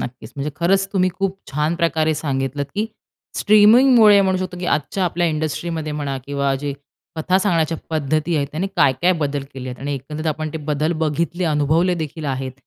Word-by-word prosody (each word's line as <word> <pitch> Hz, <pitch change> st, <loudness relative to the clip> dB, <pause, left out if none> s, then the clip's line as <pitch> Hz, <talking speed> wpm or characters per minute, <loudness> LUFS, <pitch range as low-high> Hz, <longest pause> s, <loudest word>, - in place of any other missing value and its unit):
नक्कीच 125 Hz, -, -7 dB
म्हणजे 140 Hz, +2 st, -3 dB
खरंच 195 Hz, +3 st, +2 dB
तुम्ही 185 Hz, -2 st, +2 dB
खूप 195 Hz, -1 st, -1 dB
छान 150 Hz, +4 st, 0 dB
प्रकारे 160 Hz, -2 st, +1 dB
सांगितलंत 140 Hz, -1 st, -2 dB
की 215 Hz, +2 st, 0 dB, 0.5 s
स्ट्रीमिंगमुळे 215 Hz, 0 st, +6 dB
म्हणू 190 Hz, -1 st, +1 dB
शकतो 185 Hz, -1 st, -4 dB
की 175 Hz, -, -4 dB
आजच्या 155 Hz, +6 st, 0 dB
आपल्या 175 Hz, 0 st, 0 dB
इंडस्ट्रीमध्ये 155 Hz, 0 st, -2 dB
म्हणा 145 Hz, -2 st, -3 dB
किंवा 140 Hz, -1 st, 0 dB
जे 140 Hz, +1 st, -4 dB, 0.4 s
कथा 180 Hz, +4 st, +2 dB
सांगण्याच्या 165 Hz, -5 st, +1 dB
पद्धती 155 Hz, +2 st, 0 dB
आहे, 145 Hz, -, +1 dB
त्याने 165 Hz, +5 st, -2 dB
काय-काय 150 Hz, +4 st, +3 dB
बदल 145 Hz, -2 st, -1 dB
केले 130 Hz, -1 st, -6 dB
आहेत 125 Hz, 0 st, -7 dB
आणि 140 Hz, +1 st, -3 dB
एकंदरीत 150 Hz, +4 st, -6 dB
आपण 155 Hz, 0 st, -2 dB
ते 160 Hz, -, -4 dB
बदल 150 Hz, +1 st, -1 dB
बघितले, 170 Hz, +4 st, -1 dB
अनुभवले 160 Hz, +3 st, +2 dB
देखील 160 Hz, -1 st, -5 dB
आहेत. 130 Hz, -1 st, -3 dB
155 Hz, 175 wpm, -20 LUFS, 145-180 Hz, 0.5 s, स्ट्रीमिंगमुळे